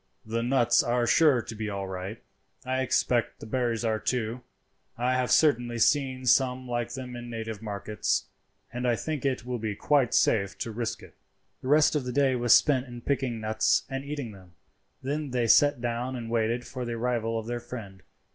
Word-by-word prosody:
"The 115 +1 -2
nuts 120 -1 +3
are 120 0 +1
sure 130 0 +4
to 110 - -7
be 110 -1 -4
all 100 -1 -4
right; 95 +4 -6 0.4
I 130 +1 0
expect 125 -2 +1
the - - -9
berries 120 0 -1
are 110 -1 +1
too. 120 0 -2 0.6
I 125 +2 +1
have 130 -1 0
certainly 120 -6 +3
seen 130 +1 +2
some 130 0 +2
like 120 -1 -2
them 125 -2 -7
in 120 0 -7
native 110 -2 -5
markets, 105 0 -2 0.5
and 125 +1 -2
I 120 - +3
think 150 +2 -4
it 130 -3 -1
will 125 -1 -3
be 110 -2 -3
quite 140 +1 +2
safe 100 -3 +2
to 115 - -4
risk 115 +1 -4
it." - - -14 0.5
The - - -7
rest 150 +2 +4
of 145 - 0
the 125 - -3
day 135 0 +2
was 120 -1 +1
spent 135 -3 +3
in 120 -1 -9
picking 130 -3 -1
nuts 110 0 +2
and 135 0 -3
eating 140 -5 -5
them. 95 -3 -15 0.5
Then 145 +2 -2
they 125 -2 0
sat 145 +3 +5
down 120 +2 -2
and 115 -2 -6
waited 115 +1 0
for 130 -2 -6
the 120 -1 -3
arrival 115 -1 -1
of 110 - -4
their 120 +1 -3
friend. 110 -6 -9
120 Hz, 195 wpm, -27 LUFS, 115-130 Hz, 0.6 s, sat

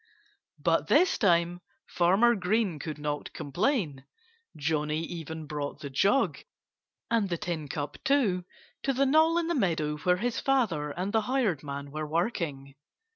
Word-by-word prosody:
But - - +1
this 370 - +4
time 175 -3 +2 0.3
Farmer 195 +8 +4
Green 195 -4 0
could 155 +2 -5
not 150 0 -4
complain. 170 - -1 0.5
Johnnie 150 +1 -1
even 160 -2 -6
brought 145 0 -5
the 140 -3 -6
jug 200 - +2 0.7
and 220 -4 +2
the 170 - -1
tin 165 -3 -4
cup 145 +1 -5
too 225 -11 +2 0.4
to 275 - 0
the 270 +2 +2
knoll 315 +4 +4
in 345 - +1
the 340 - 0
meadow 160 - 0
where 180 +4 +2
his 235 +4 -1
father 210 - +1
and 180 +7 -3
the 220 - +3
hired 215 - 0
man 140 -1 -6
were 155 +1 -4
working. 155 - -2
175 Hz, 150 wpm, -28 LUFS, 150-230 Hz, 0.7 s, this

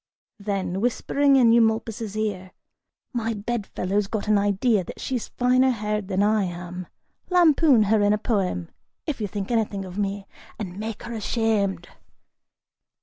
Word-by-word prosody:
(Then, 195 -2 -2
whispering 275 +4 +2
in 245 -4 +6
Eumolpus' 225 -2 +1
ear,) 195 -4 -3 0.6
"My 230 -2 -1
bedfellow's 205 -2 -2
got 215 0 -3
an 210 - +4
idea 205 +1 +2
that - - -10
she's 250 -4 -3
finer 255 +1 +3
haired 210 -4 -2
than 195 0 +1
I 210 -1 +2
am; 180 0 -6 0.4
lampoon 320 - +5
her 210 +1 +2
in 205 0 +3
a 210 - +3
poem, 190 - -1 0.3
if 290 -7 -3
you 210 - -1
think 200 +2 -5
anything 210 -4 0
of 185 +2 -7
me, 200 0 -2 0.3
and 190 -3 -6
make 220 0 -5
'er 235 - -5
ashamed." 210 -5 0
210 Hz, 145 wpm, -24 LUFS, 195-230 Hz, 0.6 s, in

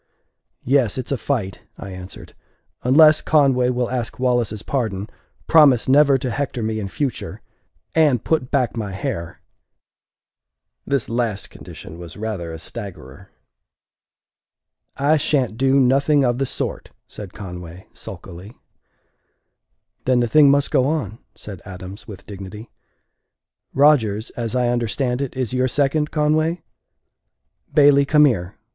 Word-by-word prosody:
"Yes, 130 -4 +2
it's 130 +1 -5
a - - +2
fight," 110 -7 -3 0.2
I 100 - -8
answered, 90 0 -10 0.5
"unless 155 +4 +6
Conway 135 -5 +3
will 125 -1 -1
ask 120 -3 -3
Wallace's 120 -5 0
pardon, 110 -7 -2 0.4
promise 145 -7 +5
never 140 +1 +5
to 125 -1 -3
hector 135 -4 -3
me 110 0 -2
in 100 - -4
future 135 +6 -4 0.5
and 150 -8 +3
put 155 -6 0
back 130 -5 0
my 105 -4 -4
hair!" 95 -6 -5 1.5
This 140 -5 0
last 115 -4 -2
condition 85 - -11
was 85 0 -10
rather 105 -6 -4
a 80 - -6
staggerer. 85 -1 -9 1.7
"I 150 +3 +3
sha'n't 135 -6 0
do 135 +3 +3
nothing 140 +2 +3
of 120 0 0
the 135 - 0
sort," - - -4 0.2
said 100 -4 -10
Conway, 90 -2 -9
sulkily. 95 +7 -10 1.5
"Then 130 -1 +3
the 120 - +1
thing 150 +3 +6
must 140 0 +2
go 130 - +3
on," 130 -8 -2 0.2
said 100 -4 -9
Adams, 95 +1 -9
with 100 -3 -11
dignity. 100 +2 -9 1.0
"Rodgers, 120 -7 +3
as 115 0 -4
I 125 -1 +1
understand 125 +2 -1
it, 135 -1 -4
is 130 -2 -2
your 130 0 +1
second, 150 +3 +1
Conway? 155 +2 0 1.1
Bailey, 140 -2 +6
come 150 +1 +5
here. 95 -10 -1
125 Hz, 130 wpm, -21 LUFS, 105-140 Hz, 1.7 s, unless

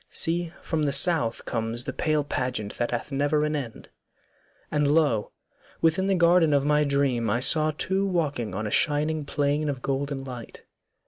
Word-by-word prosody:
See 170 0 +2
from 160 -2 -2
the 145 -2 +1
South 145 -7 +2
Comes 115 +1 -2
the 130 - -5
pale 155 +1 0
pageant 125 -7 -3
that 120 - 0
hath 120 +4 -4
never 145 +2 0
an 150 0 -2
end.' 125 -6 -7 0.8
And 150 -1 +1
lo! 145 -9 +1 0.5
within 165 +4 +1
the 195 - +2
garden 170 -3 +4
of 140 0 +1
my 150 0 +3
dream 140 -5 0
I 115 - +1
saw 155 +4 +3
two 190 +6 +1
walking 145 - -2
on 110 +2 -3
a 105 - -4
shining 150 +1 +1
plain 145 +1 -1
Of 135 -3 -5
golden 140 0 -3
light. 125 -3 -10
145 Hz, 175 wpm, -25 LUFS, 125-155 Hz, 0.8 s, garden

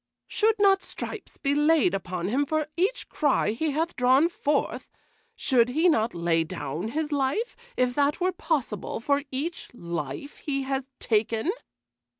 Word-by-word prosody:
"Should 440 0 +2
not 390 -1 +5
stripes - - -7
be 280 - 0
laid 295 - +4
upon 180 -2 -3
him 275 +7 +1
for 310 0 0
each 390 +9 0
cry 290 -8 +1
he 310 +8 -1
hath 320 +4 -1
drawn 260 +6 +4
forth? 295 -4 -1 0.5
Should 245 -3 +3
he 315 +8 +3
not 225 - +1
lay 170 -1 +2
down 165 +1 -4
his 305 +5 -2
life, 285 - 0 0.2
if 250 -1 +2
that 285 +2 +1
were 365 +1 +2
possible, 290 - -2
for 280 +4 +1
each 310 +6 -4
life 170 - -5
he 275 -2 -2
hath 270 0 -2
taken?" 225 - +1
275 Hz, 155 wpm, -26 LUFS, 220-315 Hz, 0.5 s, not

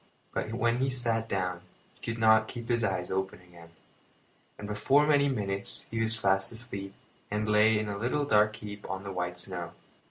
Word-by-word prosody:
But 110 - -2
when 120 0 +1
he 135 +1 +1
sat 115 -3 -1
down 90 -2 -1 0.3
he - - -22
could 115 0 -3
not 110 0 +5
keep 120 -1 -7
his 120 -1 +2
eyes 95 -4 -1
open, 95 0 -2 1.2
and 105 - -7
before 135 +8 +3
many 145 -2 +4
minutes 100 -6 -1
he 115 0 -1
was 110 0 0
fast 95 -1 +2
asleep 100 -4 -4 0.3
and 105 +1 -1
lay 105 +1 +4
in 105 0 -1
a 100 -1 -4
little 130 +6 0
dark 105 -4 +4
heap 105 -2 -8
on 95 +1 -4
the 100 - -5
white 90 -1 -3
snow. 90 -2 -6
105 Hz, 185 wpm, -29 LUFS, 95-115 Hz, 1.2 s, not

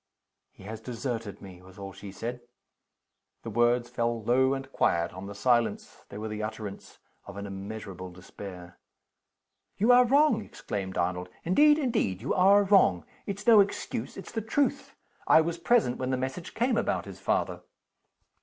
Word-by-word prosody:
"He - - -17
has 110 +2 -7
deserted 115 -4 -5
me!" 90 -2 -11
was 95 +1 -16
all 100 -1 -8
she 95 +1 -9
said. 120 +5 -5 1.0
The 115 - -6
words 120 +2 +2
fell 120 -2 -2
low 130 +4 +3
and 135 0 -7
quiet 85 -7 +1
on 95 +2 -8
the 100 - -8
silence: 120 +2 0
they - - -8
were 110 +1 -4
the 110 0 -5
utterance 105 -2 -7 0.3
of 100 - -9
an 100 - -5
immeasurable 95 -1 -7
despair. 90 0 -11 1.0
"You 220 +5 +4
are 250 0 +8
wrong!" 275 -4 +4
exclaimed 95 -2 -5
Arnold. 90 +1 -1
"Indeed, 295 - +5
indeed 230 - 0
you 120 - -2
are 200 +2 +5
wrong! 190 - +4 0.2
It's 200 +1 -5
no 230 -3 +8
excuse 200 0 -1
it's - - -9
the 225 - -2
truth. 270 +6 -1 0.3
I - - +7
was 170 +1 -3
present 195 - +2
when 130 - -2
the 130 - 0
message 130 +7 -5
came 240 0 +1
about 230 - 0
his - - -10
father." - - -1
120 Hz, 165 wpm, -28 LUFS, -, 1.0 s, are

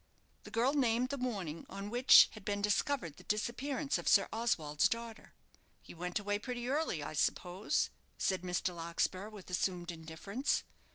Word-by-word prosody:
The - - -8
girl 245 +5 +2
named 250 -3 +2
the 280 - -3
morning 195 -11 -3
on 200 +1 -6
which 245 +2 +8
had 215 - -11
been 205 +1 -1
discovered 205 - 0
the - - -13
disappearance 265 +7 -1
of - - -7
Sir 200 - +6
Oswald's 160 -10 +1
daughter. 230 -1 -6 0.4
"He - - -13
went 180 +1 -3
away 205 0 -1
pretty 245 +1 -4
early, 275 - 0
I 155 - -5
suppose?" 180 +5 0 0.3
said 190 -2 0
Mr. 180 0 -1
Larkspur, 170 +4 -2
with 205 -4 -11
assumed 180 -1 -1
indifference. 170 - -2
205 Hz, 160 wpm, -34 LUFS, 180-240 Hz, 0.4 s, which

